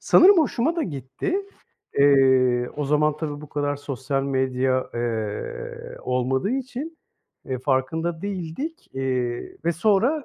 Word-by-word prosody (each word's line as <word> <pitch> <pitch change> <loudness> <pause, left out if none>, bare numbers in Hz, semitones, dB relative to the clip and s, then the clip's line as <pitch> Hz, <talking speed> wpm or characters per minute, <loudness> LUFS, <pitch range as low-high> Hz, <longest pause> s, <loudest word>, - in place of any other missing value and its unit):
sanırım 375 +2 +7
hoşuma 310 +1 +1
da 330 - +1
gitti. 135 - -3 0.6
Eee, 130 -3 +5
o 150 - -1
zaman 150 +1 +2
tabii 150 -2 -4
bu 150 - -10
kadar 145 0 -1
sosyal 135 -1 -2
medya, 130 -1 0
eee, 110 -3 -4
olmadığı 130 - 0
için, 270 +5 -4 0.5
eee, 130 -1 -3
farkında 160 +6 -1
değildik. 200 - -5
Eee, 130 -2 -2
ve 170 - +2
sonra 220 - +2
145 Hz, 125 wpm, -24 LUFS, 130-195 Hz, 0.6 s, sanırım